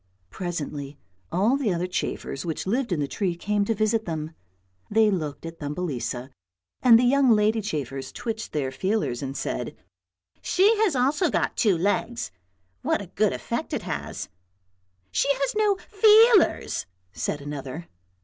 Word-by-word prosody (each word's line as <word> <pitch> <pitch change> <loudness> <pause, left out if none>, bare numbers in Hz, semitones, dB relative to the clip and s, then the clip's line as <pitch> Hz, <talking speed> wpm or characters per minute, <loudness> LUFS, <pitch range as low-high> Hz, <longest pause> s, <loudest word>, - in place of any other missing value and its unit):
Presently 150 -6 -5 0.3
all 215 +9 +3
the 255 -8 0
other 175 0 -1
chafers 180 -6 -3
which 165 -2 -3
lived 235 +4 0
in 170 - +1
the 145 - 0
tree 180 +4 -1
came 205 +3 0
to 225 - 0
visit 215 +1 +1
them; 160 -2 -4 0.6
they 220 0 +4
looked 155 -5 -3
at 165 0 -8
Thumbelisa 145 -4 -3 0.5
and 235 -3 +8
the 240 - +3
young 270 +1 +4
lady 215 0 +4
chafers 135 - -4
twitched 225 -2 -5
their 135 -3 -1
feelers 185 - -1
and 135 0 -4
said, 125 - -3 0.3
" - - -65 0.3
she 400 +5 +4
has 415 -9 +3
also 275 +8 +2
got - - 0
two 205 -7 +3
legs, 205 - -1 0.5
what - - +1
a - - -9
good - - +2
effect - - -4
it - - -2
has." - - -4 0.4
" 95 0 -45 0.3
She 280 - +2
has 275 0 -1
no 420 -2 +3
feelers," 430 - +4 0.3
said 90 - -2
another. 145 +2 -6
195 Hz, 160 wpm, -25 LUFS, 145-245 Hz, 0.6 s, and